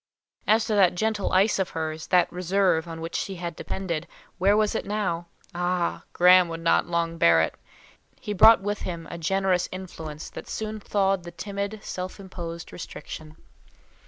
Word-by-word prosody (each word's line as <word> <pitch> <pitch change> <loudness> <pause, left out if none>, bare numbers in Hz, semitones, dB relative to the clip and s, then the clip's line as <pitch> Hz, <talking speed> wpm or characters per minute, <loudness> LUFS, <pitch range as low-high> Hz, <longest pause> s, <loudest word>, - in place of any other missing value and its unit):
As 220 +1 +4
to 220 - -1
that 190 -4 +4
gentle 215 +1 0
ice 195 +3 +3
of 190 - 0
hers—that 160 +3 0
reserve 180 -2 +1
on 165 -1 -7
which 165 +1 -5
she 195 - -2
had 170 -1 -5
depended; 170 -4 -4 0.3
where 200 +3 +4
was 215 -1 +2
it - - -1
now? 185 -5 -2 0.3
Ah! 175 0 -1
Graham 180 0 +6
would 165 0 -6
not 165 - +3
long 170 -1 -1
bear 85 -1 +6
it; 80 - +1 0.7
he 210 - -4
brought 220 +2 +7
with 205 +1 -2
him 170 -2 -5
a 170 - -6
generous 190 +1 +1
influence 160 -5 -7
that - - -9
soon 215 0 -4
thawed 195 -2 +1
the 175 - -9
timid, 200 +3 -5
self 185 +2 -5
imposed 170 -3 -7
restriction. 155 -2 -8
180 Hz, 165 wpm, -26 LUFS, 170-200 Hz, 0.7 s, brought